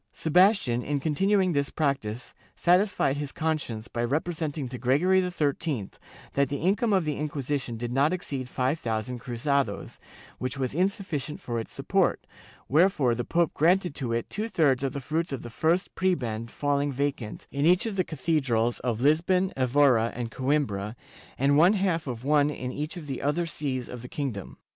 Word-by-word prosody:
Sebastian, 175 - +3
in 145 +2 -1
continuing 185 +5 +2
this 140 -1 0
practice, 135 -6 -2 0.2
satisfied 180 -6 +2
his 145 -1 -4
conscience 150 -9 -2
by 120 - -3
representing 155 +1 -2
to 125 -1 -7
Gregory 155 +10 +3
XIII 150 - -1 0.4
that 140 -1 +2
the 145 - -2
income 205 - +1
of 190 -4 +3
the 150 -1 -1
Inquisition 140 -4 -3
did 120 +1 -4
not 140 +4 +3
exceed 140 -8 -4
5000 125 -3 -1
cruzados, 125 -1 -2 0.4
which 130 +1 -3
was 130 -2 -1
insufficient 180 - -2
for 120 -9 -3
its 115 - -6
support, - - 0 0.4
wherefore 150 -5 +3
the 120 +1 -2
pope 170 +3 +1
granted 175 +1 +3
to 130 -5 -3
it 115 0 -1
two 215 +2 -3
thirds 140 - +3
of 135 -1 -1
the 140 - -4
fruits 160 +5 -2
of 135 - -4
the 120 - -8
first 165 +8 +1
prebend 120 -12 -1
falling 145 +1 0
vacant 135 -5 -3
in 140 +3 +1
each 180 +4 +4
of 220 -3 -3
the 185 - +2
Cathedrals 130 -8 0
of 120 -2 -2
Lisbon, 175 +6 +3
Evora 130 -3 +3
and 120 -1 -4
Coimbra 130 -7 -1 0.4
and 140 +2 +3
one 175 +5 +6
half 185 -6 0
of 120 -2 -5
one 145 +1 +3
in 125 -4 -4
each 150 +6 -4
of 165 - -7
the 135 -3 -4
other 150 +5 0
sees 135 -6 -3
of 125 -2 -8
the 125 - -9
king 140 -3 -2
dom. 100 -3 -9
145 Hz, 175 wpm, -27 LUFS, 125-165 Hz, 0.4 s, one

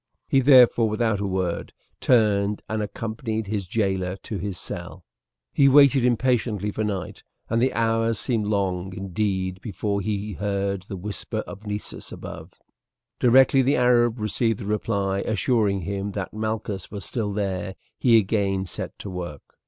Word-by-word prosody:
He 135 - +3
therefore 125 -4 +6
without 110 -1 0
a 100 - -1
word 95 -2 -2 0.3
turned 105 -4 +2
and 110 0 -2
accompanied 110 +1 -3
his 100 -2 -3
jailer 95 -3 -1
to 105 - -4
his 100 0 -4
cell. - - -6 0.5
He 140 -1 +5
waited 140 -2 +6
impatiently 120 -4 +1
for 110 - -2
night, 100 -4 -4 0.3
and 115 0 +2
the 130 - +3
hours 115 0 +1
seemed 110 -3 -1
long 95 -3 -1
indeed 95 -1 -2
before 100 0 -2
he 105 +1 -3
heard 100 -1 -2
the 95 - -5
whisper 105 +3 -4
of 105 +2 -10
Nessus 105 0 -6
above. - - -9 0.7
Directly 130 +2 +5
the 135 +3 +2
Arab 120 -1 +3
received 110 +1 0
the 105 - -6
reply, 100 -2 -1
assuring 105 -3 +1
him 100 +3 -3
that 95 -2 -4
Malchus 110 -3 -3
was 100 -1 -7
still 110 -5 -2
there, 95 -2 -3 0.2
he 120 -3 +5
again 95 -2 +1
set 90 - -6
to 100 - -7
work. 85 -6 -6
105 Hz, 150 wpm, -24 LUFS, 95-115 Hz, 0.7 s, therefore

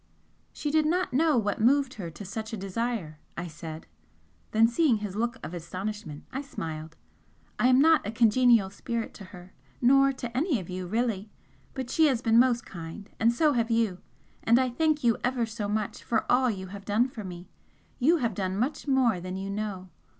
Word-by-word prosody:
"She 295 - -3
did 310 0 +3
not 360 -3 0
know 305 +1 +3
what 205 -2 0
moved 270 +3 +3
her 180 -5 -6
to 165 +6 -10
such 220 +3 -6
a - - -2
desire," 195 -5 -3 0.2
I 170 - -3
said, 160 -1 -8 0.6
then, 225 +1 +4
seeing 240 0 +2
his 205 -2 -5
look 235 +3 -1
of 165 - -7
astonishment, 185 -1 -6
I 270 - -2
smiled; 160 - -7 0.6
"I 245 - +4
am 255 0 +5
not 320 +2 +5
a - - -2
congenial 230 -2 +4
spirit 230 +3 -4
to 200 - -11
her, 180 -1 -13 0.3
nor 275 +2 +5
to 240 -3 -7
any 290 - +1
of 185 -1 -8
you, 180 0 -4
really! 220 -1 -1 0.5
but 260 -2 -4
she 320 -1 +4
has 260 -5 +1
been 225 0 +5
most 245 -1 +3
kind, 170 +3 -9
and 230 +1 +4
so 300 +5 +2
have 230 -2 0
you 225 -5 +1 0.4
and 230 +1 +5
I 255 -1 +1
thank 310 +2 +1
you 230 -2 +3
ever 245 -1 +1
so 220 -2 -4
much 210 0 -3
for 225 -2 0
all 255 0 +4
you 190 -4 -4
have 200 -1 -8
done 215 +5 +2
for 235 -5 -8
me 175 -1 -8 0.5
you 315 +7 +4
have 235 -7 -1
done 190 0 -2
much 260 +7 -2
more 255 -8 +3
than 185 +1 -6
you 195 +1 -4
know! 200 -3 -4
225 Hz, 200 wpm, -28 LUFS, 190-255 Hz, 0.6 s, am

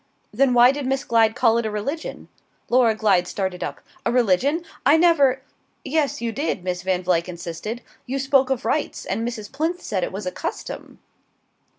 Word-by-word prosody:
"Then 255 +2 +3
why 245 +1 +7
did 275 -1 -4
Miss 270 +1 0
Glyde 225 -2 +3
call 235 -2 +3
it 235 - -2
a - - -2
religion?" 275 +10 -4 0.4
Laura 240 -3 +4
Glyde 200 -5 +2
started 190 -2 -3
up. - - -5 0.2
"A 235 - 0
religion? 250 - +2 0.2
I 285 +4 +5
never 285 -6 +4 0.2
" - - -44
"Yes, 290 -3 0
you 235 -1 -1
did," 245 - -2
Miss 180 -1 -2
Van 185 -1 -1
Vluyck 175 -1 +1
insisted; 175 +7 -6 0.2
"you 265 +2 -2
spoke 270 -1 +2
of 265 -3 -1
rites; - - -1
and - - -2
Mrs. 215 -4 -6
Plinth 325 +6 -2
said 195 -5 -2
it - - -2
was 195 +1 -6
a 180 - -2
custom." - - -6
235 Hz, 190 wpm, -23 LUFS, 195-270 Hz, 0.4 s, why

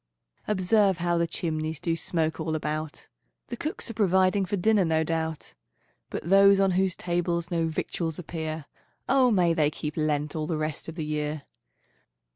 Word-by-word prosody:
Observe 200 -1 +3
how 175 0 0
the 170 - +1
chimneys 155 -2 -3
Do 165 -1 0
smoke 160 -1 -1
all 160 0 -2
about; 155 0 -4 0.4
The 240 - -3
cooks 305 +7 -4
are - - -7
providing 190 -1 +3
For 200 +2 -2
dinner, 210 +2 +3
no 160 -1 +2
doubt; 160 -1 -3 0.6
But - - -5
those 195 +1 +6
on 195 -1 +3
whose 185 0 +1
tables 175 0 -1
No 165 -1 +1
victuals 160 0 -3
appear, 160 -3 -5 0.4
O 260 -1 +4
may 180 -6 +3
they 150 -2 +2
keep 150 0 -5
Lent 150 -1 -1
All 155 -1 -2
the 160 - -1
rest 155 -1 -3
of 165 - -8
the 160 -3 -4
year. 150 -1 -3
165 Hz, 170 wpm, -27 LUFS, 155-185 Hz, 0.6 s, those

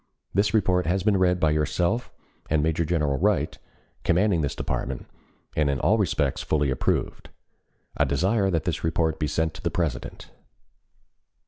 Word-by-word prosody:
This 100 +2 +2
report 90 -5 +2
has 90 +2 +1
been 105 -1 +3
read 90 -1 +2
by 80 -2 +3
yourself 85 +9 0 0.4
and 75 -1 +2
Major 80 +1 +1
General 75 -5 0
Wright, - - +1 0.5
commanding 90 0 +2
this 70 - -2
department, 65 -1 -3 0.5
and 75 -2 +2
in 70 -1 0
all 110 - +3
respects 75 -8 0
fully 75 -3 0
approved. - - -1 0.7
I 75 - +2
desire 95 - +1
that 80 -5 0
this - - -2
report 80 -1 0
be 75 - 0
sent 80 +1 -1
to - - -10
the - - 0
President. 75 -9 -3
80 Hz, 155 wpm, -25 LUFS, 75-95 Hz, 0.7 s, been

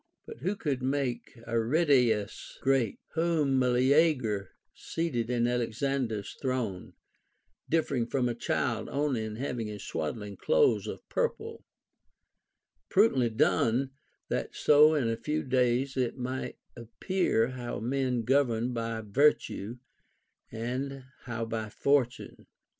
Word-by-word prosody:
But - - -9
who 185 +10 -1
could 140 -9 -2
make 130 -2 -2
Aridaeus 120 - +1
great, 135 -6 +1 0.2
whom 160 -5 +2
Meleager 125 - +2 0.2
seated 125 -9 -3
in 120 -1 +1
Alexander's 120 -2 -1
throne, 125 -9 -2 0.8
differing 140 -7 +1
from 125 0 0
a 120 - -1
child 120 - -1
only 140 -5 0
in 110 -1 -5
having 120 -2 -3
his 105 -1 -7
sAvaddling 100 +6 -4
clothes 475 -3 +3
of - - -7
purple 455 -1 -2 0.6
] - - -53
Prudently 160 - +4
done, 120 +3 +2 0.4
that - - -3
so 150 +1 +6
in 135 -6 +1
a 115 - 0
few 150 +7 -2
days 130 +1 +1
it 125 -2 -1
might 130 +1 -4 0.2
appear 120 - 0
how 125 -2 -5
men 125 0 -1
govern 125 -2 +1
by 115 -1 -3
virtue, 115 -1 +1 0.7
and 130 +4 -4 0.2
how 120 -2 -3
by 110 -1 -4
fortune. 130 +1 0
125 Hz, 120 wpm, -29 LUFS, 115-140 Hz, 0.8 s, so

